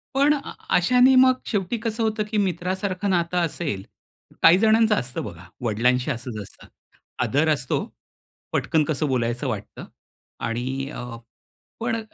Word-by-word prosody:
पण 285 +2 +5
अ 280 - -6 0.3
अशाने 250 +8 +5
मग 255 0 +5
शेवटी 205 +2 -1
कसं 225 0 -1
होतं 215 -1 0
की 215 - 0
मित्रासारखं 190 +1 -1
नातं 175 -1 +1
असेल 145 - -3 0.6
काही 165 +2 +8
जणांचं 220 0 +4
असतं 125 -5 -3
बघा, 85 +2 -9
वडिलांशी 125 +5 +1
असंच 120 -3 -5
असतं, - - -13 0.6
आदर 155 +4 +2
असतो, 135 -3 -1 0.7
पटकन 155 -2 +2
कसं 150 0 -1
बोलायचं 125 0 -1
वाटतं 105 -3 -5 0.6
आणि 130 +4 -3
अ, 120 - -6 0.7
पण 230 0 -1
170 Hz, 135 wpm, -24 LUFS, -, 0.7 s, काही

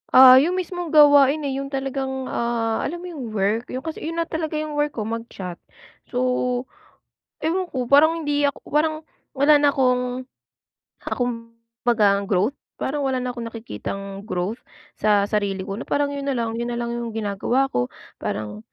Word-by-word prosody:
Ah, 255 0 +10
yung 340 +7 +1
mismong 355 -1 -3
gawain, 290 -1 +6
eh, 275 -1 -2
yung 275 - -4
talagang, 270 -1 -3
ah 230 -1 0
alam 345 +3 -4
mo 360 - -6
yung 275 -8 -6
work? 210 +4 0
‘Yon 255 - -5
kasi 320 -1 -5
‘yon 330 - -4
na 335 - +1
talaga 320 -1 -3
yung 305 0 -2
work 295 0 0
ko, 220 - -2
mag-chat. 215 -5 -6 0.5
So, 250 0 0 0.8
ewan 350 +3 -1
ko 250 -2 -2
parang 315 +5 +5
hindi 290 -2 0
ak 285 -1 +1
parang 310 +1 0 0.2
wala 285 +2 +5
na 290 -1 +4
akong 250 -1 0 0.8
ah, - - -1
kumbaga 230 -3 0
growth 205 +8 +1 0.2
parang 285 +1 -2
wala 260 -1 0
na 250 - -2
akong 240 -1 -5
nakikitang 200 - -6
growth 185 +3 -2 0.4
sa 210 -1 +3
sarili 200 -3 0
ko. 195 +2 -5
Na - - -6
parang 285 0 +1
‘yon 280 0 -4
nalang. 230 -4 -1
‘Yon 240 0 -2
nalang 235 0 -2
yung 235 -1 -4
ginagawa 225 +6 0
ko, 125 0 0 0.3
parang 105 0 -4
255 Hz, 170 wpm, -23 LUFS, 230-290 Hz, 0.8 s, Ah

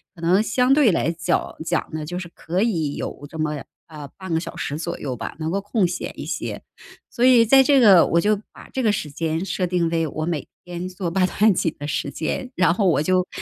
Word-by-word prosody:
可 170 - -14
能 180 +4 +3
相 250 +4 +2
对 275 -6 +5
来 165 -2 +1
角 165 -1 -2
讲 - - -1
呢， 155 -1 -3
就 175 +4 -5
是 180 -1 -5
可 180 +4 -2
以 165 -11 -1
有 145 - -6
这 160 - -9
么， 150 -3 -2 0.2
呃， 150 -3 -9
半 190 -3 -5
个 160 - +2
小 - - -7
时 145 - -3
左 170 +1 -4
右 130 -3 -4
吧， - - -6
能 160 0 -3
够 200 +2 -1
空 205 -1 +1
闲 175 +1 -5
一 - - -5
些。 - - -4 0.5
所 240 - -2
以 250 -2 +6
在 270 +4 +7
这 275 +1 +4
个， 195 -8 +7
我 170 - +2
就 210 +4 +2
把 - - -14
这 265 - -1
个 220 -4 +3
时 155 -7 -3
间 160 +3 -2
设 185 -2 -1
定 175 -1 +1
为 165 -1 0
我 155 +2 -4
每 165 -4 -3 0.2
天 175 0 -6
做 180 -2 -4
八 185 +1 +2
段 210 +2 +3
锦 165 -2 -1
的 145 - -6
时 145 - -2
间， 160 - -3
然 180 -2 +3
后 195 +1 +1
我 160 -4 +2
就， 185 +2 +1
175 Hz, 260 characters per minute, -22 LUFS, 160-205 Hz, 0.5 s, 在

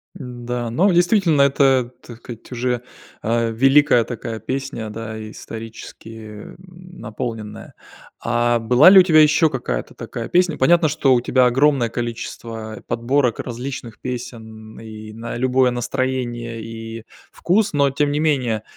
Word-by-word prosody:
Н-да, 125 -5 -5
но 190 - +3
действительно, 175 -3 +3
это, 135 -3 +2
так 120 - -12
сказать, 115 0 -11
уже, 125 -1 -2 0.4
а, 115 +1 0
великая 135 +1 +4
такая 115 -1 -6
песня, 130 -4 -5
да, 110 0 -7
исторически, 110 -1 -10
м, - - -12 0.4
наполненная. 110 -1 -7 0.5
А 120 0 +1
была 125 +8 +6
ли 195 0 +9
у - - +8
тебя 155 -4 +5
ещё 155 +1 +4
какая-то 120 - -4
такая 115 - -7
песня? 175 -3 +1
Понятно, 165 +4 +4
что 140 -3 +2
у 120 - +2
тебя 125 0 +2
огромное 130 -1 +2
количество, 115 -1 -6
э, - - -11
подборок 120 0 0
различных 120 -2 -6
песен 110 -3 -8
и 110 -1 -10
на 115 +1 -7
любое 130 0 +2
настроение, 120 -2 -3
и 115 0 -8 0.3
вкус. 200 +1 0
Но 140 -1 +2
тем 145 +1 0
не 145 - -1
менее, 130 -9 0
120 Hz, 140 wpm, -20 LUFS, 115-140 Hz, 0.5 s, ли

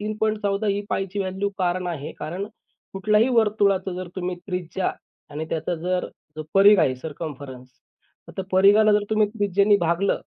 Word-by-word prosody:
3.14 215 -1 -1
ही 200 0 0
पायची 195 +1 -2
value 190 +1 -2
कारण 180 0 0
आहे 155 -4 -5
कारण 180 +7 -4 0.5
कुठल्याही 210 +4 +2
वर्तुळाचं 205 -5 +2
जर 185 -1 -5
तुम्ही 180 -1 -3
त्रिज्या 180 0 -2 0.4
आणि 150 +2 -4
त्याचा 165 +2 -2
जर 180 +2 -2 0.5
परिघ 200 +1 +7
आहे, 130 - +2
सर्कम्फरन्स. 140 -4 -8 0.6
आता 190 - -5
परिघाला 205 +3 +6
जर 210 0 +2
तुम्ही 215 -1 +3
त्रिज्येने 205 -1 +2
भागलं 170 +4 +1
195 Hz, 140 wpm, -23 LUFS, 175-205 Hz, 0.6 s, परिघ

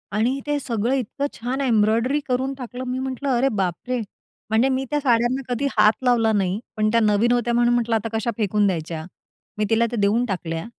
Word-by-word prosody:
आणि 245 +6 +1
ते 295 0 +1
सगळं 235 -2 -1
इतकं 270 +2 -2
छान 250 +4 -3
एम्ब्रॉयडरी 230 +2 +2
करून 260 +1 0
टाकलं. 250 -1 -7
मी 250 +1 -2
म्हटलं, 265 +1 -3
"अरे 250 +3 +2
बापरे!" 190 +8 -2 0.5
म्हणजे 225 +4 +3
मी 265 +1 -2
त्या 295 - 0
साड्याना 245 -1 +2
कधी 280 +4 -1
हात 210 +1 +6
लावला 235 -3 +3
नाही. 195 -1 0 0.2
पण 215 0 +2
त्या 230 - +4
नवीन 215 +2 +3
होत्या 240 -1 +1
म्हणून 240 0 +3
म्हटलं, 235 -1 +1
"आता 225 +1 -1
कश्या 225 +2 -1
फेकून 210 -1 +1
द्यायच्या." 165 -3 -3 0.5
मी 210 - +1
तिला 230 +1 +3
त्या 235 - -2
देऊन 215 +5 +2
टाकल्या 165 -6 -4
235 Hz, 195 wpm, -22 LUFS, 215-255 Hz, 0.5 s, हात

